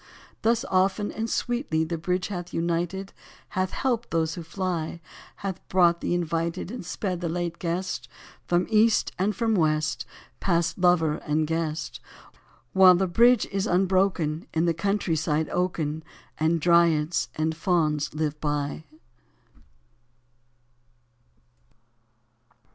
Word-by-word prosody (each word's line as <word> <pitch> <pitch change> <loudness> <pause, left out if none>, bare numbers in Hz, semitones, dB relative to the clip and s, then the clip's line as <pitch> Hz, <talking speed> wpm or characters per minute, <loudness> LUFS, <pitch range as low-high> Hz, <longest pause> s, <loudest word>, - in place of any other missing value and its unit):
Thus 230 +3 +2
often 195 +1 +1
and 225 +1 -3
sweetly 240 - 0
The 165 +1 -3
bridge 180 +3 -1
hath 180 -3 -5
united, 175 +3 -2 0.4
Hath 185 0 -1
helped 240 -1 -1
those 160 -1 0
who 175 - -6
fly, 170 -1 -3 0.5
Hath 190 -2 -3
brought 175 -2 +4
the - - 0
invited 170 +1 -2
And 245 - -6
sped 180 0 -3
the 170 - -2
late 170 0 -3
guest. 170 -7 -3 0.4
From 175 +1 +2
east 220 0 +4
and 200 +2 +1
from 230 -2 +1
west 155 -3 +1 0.3
Pass 170 -3 +1
lover 175 -4 +3
and 155 +1 0
guest, 160 -1 -3 0.7
While 185 -1 +8
the 190 +2 +1
bridge 235 +6 +4
is 195 +1 -1
unbroken 185 -4 +1
In 160 +1 +2
the 170 - +2
countryside 165 -4 0
oaken. 160 -4 -1 0.4
And 160 +2 +2
Dryads 170 -1 +3
and 160 +1 -1
Fauns 155 -3 +1
live 150 -1 -2
by. 145 +1 -2
175 Hz, 120 wpm, -26 LUFS, 160-190 Hz, 0.7 s, While